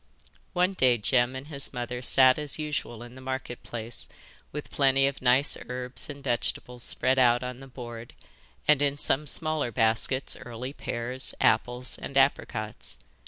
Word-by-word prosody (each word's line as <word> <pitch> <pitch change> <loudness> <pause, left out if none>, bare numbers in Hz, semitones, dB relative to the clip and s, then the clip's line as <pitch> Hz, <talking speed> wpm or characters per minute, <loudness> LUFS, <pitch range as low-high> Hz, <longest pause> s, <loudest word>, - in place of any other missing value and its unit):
One 180 +1 +2
day 130 -9 +4
Jem 120 +3 +2
and 130 +1 -6
his 140 -3 +1
mother 125 0 -4
sat 130 +1 +5
as 150 -1 -1
usual 150 -6 -4
in 120 0 -11
the 130 - -12
Market 130 -2 -5
Place 115 0 -7 0.4
with 150 0 -7
plenty 135 -1 +3
of 140 0 -2
nice 130 +3 +4
herbs 125 +2 -4
and 140 -1 -8
vegetables 125 -1 -2
spread 130 +1 +2
out 120 -1 +4
on 125 0 -5
the 135 - -11
board, 120 -3 -9 0.5
and 150 -2 +5
in 145 0 +1
some 145 +1 0
smaller 155 -1 0
baskets 115 +4 +1
early 125 +3 -7
pears, 125 0 -1
apples, 125 +3 +1
and 140 - -4
apricots. 120 -5 0
130 Hz, 160 wpm, -28 LUFS, 120-140 Hz, 0.5 s, sat